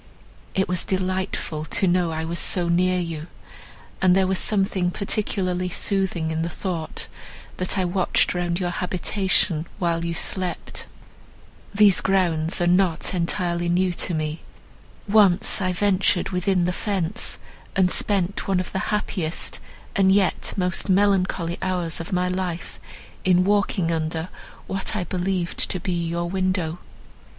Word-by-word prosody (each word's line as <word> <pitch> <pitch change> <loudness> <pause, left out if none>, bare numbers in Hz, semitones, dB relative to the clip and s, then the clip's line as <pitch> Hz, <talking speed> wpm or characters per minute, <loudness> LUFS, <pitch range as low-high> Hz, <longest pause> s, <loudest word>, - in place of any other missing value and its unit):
It 190 - +2
was 180 -1 -1
delightful 185 -4 -2
to 175 - +1
know 180 -1 +2
I 160 0 -3
was 170 +1 -2
so 175 -2 +1
near 180 +2 +2
you, 165 -2 -4 0.7
and 185 -1 +5
there 190 0 +4
was 190 0 0
something 195 -3 +1
particularly 185 -2 -1
soothing 185 -4 0
in 160 0 -1
the 165 - -1
thought, 170 -2 -3 0.5
that 185 +2 +1
I 185 - +1
watched 180 +1 +2
round 175 -1 -1
your 175 -2 -1
habitation, 180 -2 0
while 170 -2 0
you 170 0 -2
slept. 185 +1 -3 0.8
These 200 -5 +5
grounds 175 -4 +1
are 175 - +2
not 180 -1 +2
entirely 175 0 -1
new 180 +1 +2
to 175 0 -1
me. 155 0 -3 0.7
Once 200 -2 +4
I 185 -1 +1
ventured 190 0 +2
within 180 -1 +1
the 180 - 0
fence, 200 +1 -1 0.4
and 185 -1 +3
spent 200 -2 +1
one 190 -2 +2
of 185 - -4
the 190 - -1
happiest, 185 -5 -2 0.4
and 190 -1 +4
yet 195 -1 +2
most 180 +1 0
melancholy 185 -3 +2
hours 180 -3 -1
of 165 +4 -6
my 180 0 +1
life 180 -2 -4 0.4
in 180 -1 +4
walking 195 -3 +1
under 160 +1 -2 0.4
what 195 +3 -2
I 200 - 0
believed 180 0 -1
to 185 - -2
be 185 +1 -2
your 170 0 -2
window." 185 -2 -1
180 Hz, 145 wpm, -23 LUFS, 170-190 Hz, 0.8 s, and